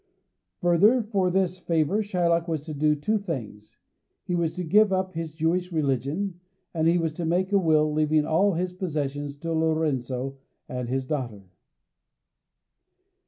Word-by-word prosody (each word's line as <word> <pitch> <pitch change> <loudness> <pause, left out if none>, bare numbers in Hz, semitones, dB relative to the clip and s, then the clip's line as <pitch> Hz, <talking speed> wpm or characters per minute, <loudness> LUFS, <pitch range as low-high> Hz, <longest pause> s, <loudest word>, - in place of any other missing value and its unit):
Further, 200 +8 +4
for 200 -4 0
this 185 0 0
favour 170 +4 +1
Shylock 175 -4 +1
was 160 -3 -2
to 155 +1 -7
do 150 +1 +2
two 215 +9 0
things: 115 - -7 0.5
he 180 - -4
was 170 -2 0
to 180 - -3
give 205 +5 +4
up 185 0 0
his 165 -2 -5
Jewish 175 +3 0
religion, 155 +5 -1 0.3
and 160 -1 +1
he 170 +1 +4
was 165 -2 -1
to 170 - -5
make 180 +4 0
a 200 - +4
will, 155 -3 +3
leaving 155 0 +2
all 190 +6 +2
his 180 +2 -2
possessions 145 -5 -3
to 165 +3 -4
Lorenzo 135 -5 -1 0.3
and 125 -1 -4
his 130 +1 -1
daughter. 125 -8 -4
165 Hz, 155 wpm, -26 LUFS, 150-180 Hz, 0.5 s, Further